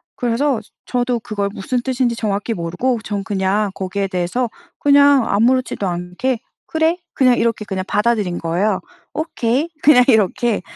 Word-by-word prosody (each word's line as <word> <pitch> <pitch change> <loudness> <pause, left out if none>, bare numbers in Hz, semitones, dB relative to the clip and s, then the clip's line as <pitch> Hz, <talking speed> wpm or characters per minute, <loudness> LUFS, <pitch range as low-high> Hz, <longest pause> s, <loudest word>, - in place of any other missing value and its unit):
그래서 245 +1 0 0.3
저 250 - -1
저도 245 -1 0
그걸 210 -3 -3
무슨 245 +6 -2
뜻인지 250 -2 0
정확히 210 +1 -2
모르고 180 +8 -1
전 205 -2 -3
그냥 195 +1 0
거기에 195 +1 -2
대해서 190 +6 -1 0.3
그냥 285 -3 +5
아무렇지도 235 -1 +1
않게 180 +8 -2 0.3
"그래." 320 +2 +1 0.2
그냥 255 -2 +4
이렇게 230 -2 0 0.2
받아들인 210 -4 +1
거예요. 185 +5 0 0.3
"오케이." 290 -2 -1
그냥 255 -4 +7
이렇게. 220 -1 +2
230 Hz, 330 characters per minute, -19 LUFS, 200-255 Hz, 0.3 s, 그냥